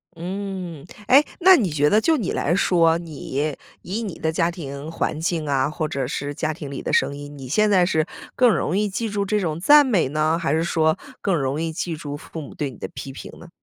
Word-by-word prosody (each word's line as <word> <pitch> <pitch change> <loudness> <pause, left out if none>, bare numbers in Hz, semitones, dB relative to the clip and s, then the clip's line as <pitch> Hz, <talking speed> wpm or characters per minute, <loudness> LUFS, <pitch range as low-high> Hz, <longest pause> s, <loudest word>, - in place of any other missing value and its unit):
嗯， 180 -3 -5 0.2
诶， 275 +3 +7 0.2
那 375 +1 +8
你 220 - +1
觉 150 -1 +2
得 215 +5 +4
就 320 +6 +3
你 215 -9 -2
来 170 - 0
说， 165 -4 +3
你 150 -3 -4 0.3
以 205 +6 -3
你 205 -7 -5
的 160 - -1
家 165 +1 +1
庭 145 -3 -7
环 160 -2 -2
境 165 -2 -1
啊， 135 -1 +1
或 155 +1 -2
者 135 -3 -2
是 145 +2 -3
家 155 +2 -2
庭 150 -3 -8
里 135 - -5
的 - - -3
声 140 - +2
音， 145 0 -9
你 135 -2 -8
现 210 +11 +2
在 185 -3 +4
是 160 -2 +1 0.3
更 250 -1 +5
容 175 - -1
易 210 0 +1
记 225 +4 -2
住 205 -1 -1
这 210 +2 0
种 165 -5 -2
赞 290 +10 +7
美 210 - +2
呢， 155 +2 +1
还 165 -4 -1
是 160 +1 +1
说 160 -2 +2 0.2
更 195 -3 +1
容 140 0 -1
易 165 0 -2
记 165 +1 -3
住 145 -2 -6
父 160 +2 -8
母 145 - -10
对 145 -3 -3
你 120 - -14
的 - - -5
批 130 +1 -8
评 135 - -9
呢？ 175 - -13
165 Hz, 255 characters per minute, -22 LUFS, 145-190 Hz, 0.3 s, 那